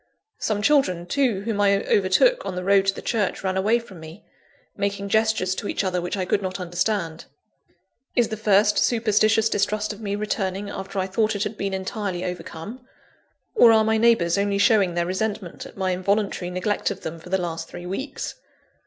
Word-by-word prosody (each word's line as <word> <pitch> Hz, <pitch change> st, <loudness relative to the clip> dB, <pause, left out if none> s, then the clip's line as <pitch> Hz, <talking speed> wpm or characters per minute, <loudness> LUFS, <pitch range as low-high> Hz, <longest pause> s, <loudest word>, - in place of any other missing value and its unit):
Some 205 Hz, -1 st, -1 dB
children, 200 Hz, -, +2 dB
too, 235 Hz, -1 st, +1 dB
whom 205 Hz, -1 st, -2 dB
I 200 Hz, -1 st, +3 dB
overtook 210 Hz, -, +3 dB
on 185 Hz, -, -4 dB
the 180 Hz, -, -3 dB
road 195 Hz, 0 st, +3 dB
to 195 Hz, -, +3 dB
the -, -, -8 dB
church, 210 Hz, -5 st, -1 dB
ran 190 Hz, -1 st, -1 dB
away 210 Hz, +5 st, +3 dB
from 210 Hz, -7 st, -10 dB
me, 160 Hz, +5 st, -12 dB, 0.5 s
making 200 Hz, 0 st, -2 dB
gestures 220 Hz, -3 st, +2 dB
to 195 Hz, -, -5 dB
each -, -, -1 dB
other 180 Hz, -2 st, -1 dB
which 175 Hz, +3 st, -3 dB
I 185 Hz, -, -1 dB
could 200 Hz, -, +1 dB
not 185 Hz, 0 st, -4 dB
understand. 175 Hz, -1 st, -2 dB, 0.9 s
Is 240 Hz, -3 st, +3 dB
the 220 Hz, -, -3 dB
first 210 Hz, -1 st, +3 dB
superstitious 220 Hz, -1 st, +3 dB
distrust 215 Hz, 0 st, 0 dB
of 210 Hz, -, -12 dB
me 200 Hz, -1 st, -2 dB
returning 200 Hz, -1 st, -2 dB
after 195 Hz, +1 st, -6 dB
I 190 Hz, -, +1 dB
thought 215 Hz, +3 st, 0 dB
it 200 Hz, -, -1 dB
had 215 Hz, 0 st, -4 dB
been 195 Hz, -2 st, -2 dB
entirely 190 Hz, -1 st, -3 dB
overcome? 180 Hz, +6 st, -7 dB, 0.7 s
Or 240 Hz, -, +7 dB
are 220 Hz, -1 st, +5 dB
my 220 Hz, 0 st, +2 dB
neighbours 205 Hz, -6 st, +3 dB
only 200 Hz, 0 st, +1 dB
showing 200 Hz, -4 st, +3 dB
their 170 Hz, 0 st, +1 dB
resentment 190 Hz, 0 st, -3 dB
at -, -, -16 dB
my 190 Hz, -1 st, 0 dB
involuntary 195 Hz, 0 st, -1 dB
neglect 185 Hz, +3 st, -1 dB
of 200 Hz, -, -6 dB
them 165 Hz, +1 st, -6 dB
for 170 Hz, -, -13 dB
the 190 Hz, -, +2 dB
last 170 Hz, -3 st, -4 dB
three 175 Hz, 0 st, -9 dB
weeks? 195 Hz, +11 st, -4 dB
200 Hz, 195 wpm, -23 LUFS, 185-215 Hz, 0.9 s, Or